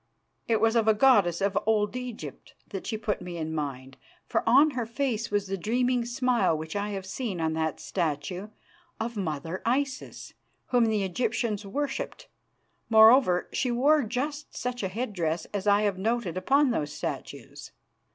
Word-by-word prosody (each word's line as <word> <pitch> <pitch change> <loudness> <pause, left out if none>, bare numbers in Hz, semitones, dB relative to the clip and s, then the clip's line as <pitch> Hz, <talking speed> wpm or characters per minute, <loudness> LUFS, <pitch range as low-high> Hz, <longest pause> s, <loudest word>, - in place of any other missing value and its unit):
It 225 -2 +2
was 225 +1 +3
of 225 -2 +3
a 220 - +5
goddess 205 -8 +4
of 200 0 +1
Old 210 0 +2
Egypt 235 - -7
that 195 - -6
she 220 - -2
put 210 -2 -2
me 180 -1 -6
in 160 -1 -3
mind, 135 -3 -5 0.3
for - - 0
on 280 +6 +6
her 245 -4 -3
face 235 -2 -2
was 205 -1 0
the 195 0 -4
dreaming 245 +4 +1
smile 240 -8 +1
which 160 +3 -6
I 205 0 -1
have 195 -2 -5
seen 195 -1 -4
on 160 -1 0
that 160 -1 0
of - - -26
a - - -13
statue 175 +3 -2 0.5
of 235 +1 -3
mother 165 -2 -3
Isis 265 +3 -2 0.4
whom 245 -2 +4
the 215 -2 +1
Egyptians 220 +1 -1
worshipped. 290 - -4 0.6
Moreover, 220 -4 +6
she 255 - 0
wore 285 +6 +4
just 280 +6 -4
such 250 0 -3
a 195 - -1
headdress 185 -6 -2
as 205 0 -3
I 205 +1 +4
have 200 -3 0
noted 220 -3 -1
upon 275 +8 +3
those 150 -10 -2
statues. 150 - -6
215 Hz, 170 wpm, -27 LUFS, 185-245 Hz, 0.6 s, on